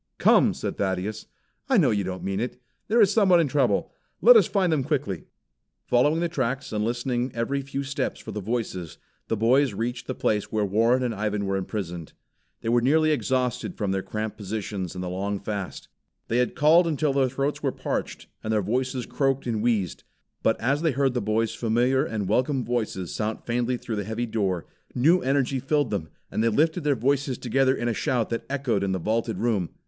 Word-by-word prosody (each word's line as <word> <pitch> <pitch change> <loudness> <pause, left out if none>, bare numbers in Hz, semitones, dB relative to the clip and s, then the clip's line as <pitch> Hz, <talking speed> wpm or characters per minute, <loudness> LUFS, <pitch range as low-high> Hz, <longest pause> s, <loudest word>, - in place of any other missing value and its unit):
"Come!" - - +4
said - - -4
Thaddeus. 100 +2 -2 0.4
"I - - +4
know - - +4
you 100 -2 +1
don't 95 0 -5
mean 95 0 -2
it. 125 +2 -4 0.3
There 230 +2 +4
is 205 -1 +5
someone 190 -5 +5
in 165 - +3
trouble. 135 -2 +1 0.3
Let - - +8
us 450 - +6
find 185 -5 +1
them 145 -4 +1
quickly." 130 - -2 0.6
Following 145 +7 +3
the 170 - +1
tracks 135 -5 -2
and 105 0 0
listening 120 +2 -1
every 130 +4 -1
few 140 0 -4
steps 140 +1 -3
for 110 - -8
the 105 0 -4
voices, 100 -6 -3 0.3
the 115 - -1
boys 125 +2 +3
reached 120 +3 -3
the 130 - -3
place 105 -2 0
where 110 -1 +1
Warren 115 +6 +2
and 120 -2 -1
Ivan 105 -1 -2
were 95 0 -1
imprisoned. 90 -4 -4 0.5
They 115 - -2
were 120 0 +3
nearly 155 +5 +3
exhausted 130 +3 -1
from 100 -3 -1
the 95 0 0
cramped 110 +2 -4
positions 100 -3 -4
and 90 - -4
the - - -4
long 100 +3 -2
fast. 100 -2 -5 0.4
They 115 - +1
had 125 - 0
called 165 +3 +5
until 150 -2 0
their 135 -2 +2
throats 135 +3 -2
were - - 0
parched, - - -4 0.2
and 110 - -2
their 105 -2 +1
voices 125 +4 -1
croaked 135 -1 0
and 115 -3 -1
wheezed. 110 -7 0 0.4
But 110 - +2
as 140 +5 +1
they 160 -4 +1
heard 135 0 +1
the 125 - -1
boys 110 +2 0
familiar 120 +4 +2
and 110 -9 -3
welcome 130 +5 +1
voices 110 -7 -2
sound 110 0 -3
faintly 120 +1 0
through 115 -2 -5
the 105 - -1
heavy 110 +4 -3
door, 100 -6 -1 0.3
new 160 +9 +4
energy 135 0 +1
thrilled 145 -2 0
then 95 -6 -2 0.2
and 110 - 0
they 115 - +4
lifted 160 +8 +1
their 145 -2 +2
voices 135 +2 0
together 135 0 +2
in 120 - -2
a 120 - +1
shout 120 0 -1
that 115 - -3
echoed 130 -8 0
in 95 -1 0
the - - 0
vaulted 110 +6 -1
room. 105 -7 0
120 Hz, 205 wpm, -25 LUFS, 105-135 Hz, 0.6 s, Let